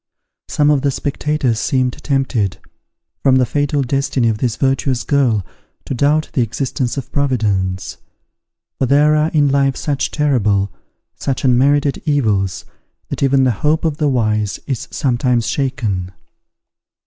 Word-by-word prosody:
Some 150 0 +2
of 145 -2 +2
the 140 - +1
spectators 140 -3 -1
seemed 130 0 0
tempted, 135 -8 0 0.6
from 135 -1 +4
the 130 -1 +4
fatal 145 +1 0
destiny 135 -2 0
of 110 -1 -2
this 120 -2 0
virtuous 135 -1 0
girl, 125 - +1 0.4
to - - -4
doubt 145 +4 +1
the 135 - +1
existence 125 +2 -2
of 135 - -5
Providence: 105 -9 -1 0.8
for 130 - +1
there 145 +3 +4
are 155 +1 +2
in 150 -3 +2
life 135 -1 +2
such 145 -2 -1
terrible, 105 -10 +1 0.4
such 135 0 -3
unmerited 140 +3 +2
evils, 105 - 0 0.4
that - - -5
even 135 -1 +3
the 130 - +3
hope 155 +2 +1
of 155 -3 -1
the 150 -2 +1
wise 110 -5 0
is 135 -4 -3
sometimes 125 -3 0
shaken. 115 -10 -2
135 Hz, 140 wpm, -17 LUFS, 115-145 Hz, 0.8 s, from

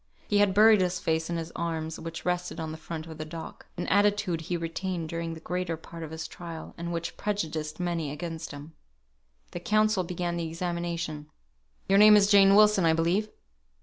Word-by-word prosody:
He 205 - +2
had 200 -2 +3
buried 215 -1 +7
his 180 0 0
face 160 0 -1
in 170 - -1
his 165 0 -5
arms, 160 -1 -3
which 165 0 -7
rested 180 -1 -2
on 160 -1 -4
the 160 - -6
front 160 -1 -6
of 160 -1 -10
the - - -2
dock 160 +1 -9
(an 175 - -2
attitude 205 -4 +2
he 175 +2 -2
retained 170 0 -3
during 165 0 -4
the - - -9
greater 180 0 -3
part 165 +1 -11
of 160 - -6
his 160 0 -6
trial, 165 -2 -8
and 170 0 -5
which 170 0 -4
prejudiced 160 -7 -3
many 170 -4 -1
against 160 +2 -5
him). 145 +3 -10 0.8
The 175 - -5
counsel 215 +1 +2
began 175 0 -3
the 165 -1 -2
examination. 170 -2 -4 0.6
"Your 195 +1 +5
name 210 0 +9
is 200 0 +4
Jane 195 -1 +7
Wilson, 210 -2 +6
I 165 -1 +4
believe." 175 +6 +1
170 Hz, 195 wpm, -28 LUFS, 160-185 Hz, 0.8 s, name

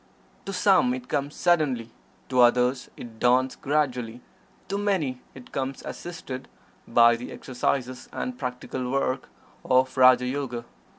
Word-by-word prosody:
To - - -2
some 180 -9 +3
it 125 0 -8
comes 145 0 -2
suddenly; 145 -10 +1 0.4
to 130 -1 +1
others 125 +1 +3
it 115 -2 -10
dawns 130 +1 +3
gradually; 125 -5 -1 0.5
to 200 +2 -2
many 165 -12 0
it 130 -2 -13
comes 135 0 -3
assisted 135 -7 -7 0.4
by 120 0 +6
the 120 +1 -7
exercises 130 0 -3
and 255 - -4
practical 125 - -4
work 135 0 -1 0.3
of 130 0 +2
"Raja 130 -1 +6
Yoga." 125 -3 -3
130 Hz, 130 wpm, -26 LUFS, 125-145 Hz, 0.5 s, by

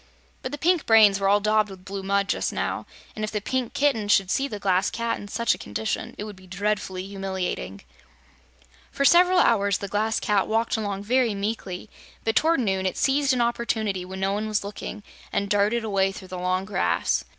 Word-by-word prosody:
But 255 - -5
the 290 - -4
pink 345 +1 +1
brains 215 -3 +6
were 195 0 +2
all 205 +1 +5
daubed 215 0 +2
with 190 -1 -12
blue 195 0 -5
mud, 200 +1 0
just - - -1
now, - - -3 0.3
and 215 - -4
if 215 - -1
the 210 - -2
Pink 250 +3 -3
Kitten 270 -8 +1
should 195 -2 +3
see 275 - +1
the 215 - -5
Glass 190 -2 +1
Cat 230 0 -2
in 205 - -9
such 235 +3 +1
a - - -8
condition, 110 +2 -4
it - - -4
would 210 -1 -8
be 185 0 -17
dreadfully 195 -1 -2
humiliating. 190 - -4 1.1
For 280 - 0
several 360 +4 +6
hours 200 - +3
the 200 - -5
Glass 215 +3 0
Cat 205 -2 +1
walked 225 +1 +1
along 200 -3 -3
very 240 -1 +2
meekly, 200 -2 -4 0.4
but 225 -1 0
toward 320 -3 +3
noon 190 -4 0
it 185 - -3
seized 275 0 +2
an 250 -2 +1
opportunity 220 -5 -1
when 190 +1 -7
no 195 +1 +1
one 210 +2 -2
was 215 -1 0
looking 205 +1 -7 0.3
and 200 0 -1
darted 210 +3 +2
away 195 -3 +1
through 190 -1 -10
the 185 0 -5
long 185 +1 0
grass. 85 - 0
205 Hz, 205 wpm, -25 LUFS, 195-225 Hz, 1.1 s, brains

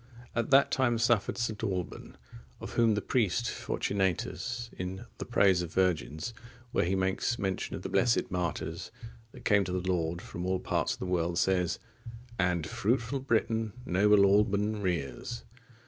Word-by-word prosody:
At 115 -1 0
that 140 0 +5
time 125 -3 +2
suffered 115 -2 +2
St. 115 -3 -2
Alban,(50) 95 -4 -3 0.4
of - - -7
whom 115 -2 +4
the 105 - -2
priest 120 0 +1
Fortunatus,(51) 100 +5 -2
in 90 +1 -5
the - - -4
Praise 95 -3 +4
of 85 -2 -5
Virgins, 90 +1 0 0.4
where - - +2
he 95 +3 +1
makes 95 +5 0
mention 95 -3 -2
of - - -7
the - - -4
blessed 115 -4 +2
martyrs 85 -2 -3 0.4
that - - -14
came 100 -2 +4
to 95 - -4
the 90 0 -2
Lord 85 -1 -1
from 90 0 -7
all 95 0 +1
parts - - 0
of - - -10
the - - -2
world, 85 -2 0
says: 90 -1 +2 0.6
And 90 -3 +1
fruitful 120 - 0
Britain 115 -4 0
noble 100 +2 +5
Alban 105 +1 +2
rears. 90 - -3
95 Hz, 160 wpm, -30 LUFS, 90-115 Hz, 0.6 s, that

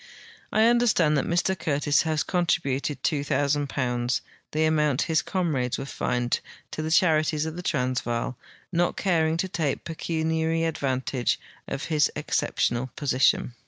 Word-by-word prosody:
I 220 - +4
understand 230 -10 +4
that 135 - 0
Mr 175 +2 +1
Curtis 145 -3 +1
has 155 -2 0
contributed 150 -5 -1
£2,000, 140 -4 0 0.3
the 155 +1 +1
amount 150 -4 +2
his 160 -1 +1
comrades 150 -10 -1
Avere 135 - -5
fined, 125 -2 -1 0.3
to - - -4
the 155 - -2
charities 155 -3 +3
of 160 0 -4
the 180 - -5
TransA'aal, 125 -5 -1 0.4
not 175 0 +1
caring 165 -4 +1
to 190 - -1
take 160 -6 -2
pecuniary 160 0 -1
advantage 130 -5 -1 0.3
of 135 +1 -4
his 150 -3 +2
exceptional 120 +2 0
position. 130 -3 +2
155 Hz, 130 wpm, -26 LUFS, 135-165 Hz, 0.4 s, I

